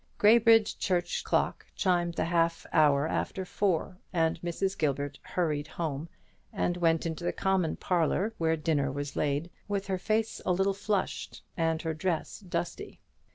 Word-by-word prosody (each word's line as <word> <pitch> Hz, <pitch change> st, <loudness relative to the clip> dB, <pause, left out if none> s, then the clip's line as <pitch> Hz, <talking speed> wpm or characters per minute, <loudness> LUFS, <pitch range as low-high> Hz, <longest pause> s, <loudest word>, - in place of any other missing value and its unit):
Graybridge 225 Hz, 0 st, +5 dB
church 180 Hz, -2 st, 0 dB
clock -, -, 0 dB
chimed 175 Hz, -3 st, +1 dB
the -, -, 0 dB
half 165 Hz, 0 st, +1 dB
hour 150 Hz, -2 st, +4 dB
after 190 Hz, +3 st, -2 dB
four, 185 Hz, -1 st, -1 dB
and 165 Hz, -2 st, +1 dB
Mrs. 190 Hz, +3 st, -1 dB
Gilbert 145 Hz, -1 st, -1 dB
hurried 155 Hz, -4 st, -1 dB
home, 160 Hz, -1 st, -4 dB, 0.4 s
and 175 Hz, -, 0 dB
went 165 Hz, -2 st, +2 dB
into 165 Hz, +1 st, -3 dB
the 175 Hz, -, +1 dB
common 190 Hz, -4 st, +1 dB
parlour, 185 Hz, +5 st, 0 dB
where 160 Hz, -1 st, +2 dB
dinner 145 Hz, -3 st, 0 dB
was 145 Hz, +1 st, -4 dB
laid, 150 Hz, +4 st, -1 dB, 0.2 s
with 200 Hz, -1 st, -1 dB
her 190 Hz, -1 st, -2 dB
face 220 Hz, +3 st, 0 dB
a -, -, +1 dB
little 195 Hz, +2 st, +2 dB
flushed, 205 Hz, 0 st, -2 dB
and 165 Hz, -1 st, 0 dB
her 160 Hz, -1 st, -1 dB
dress 160 Hz, +1 st, -2 dB
dusty. 175 Hz, -, -4 dB
170 Hz, 155 wpm, -29 LUFS, 160-190 Hz, 0.4 s, Graybridge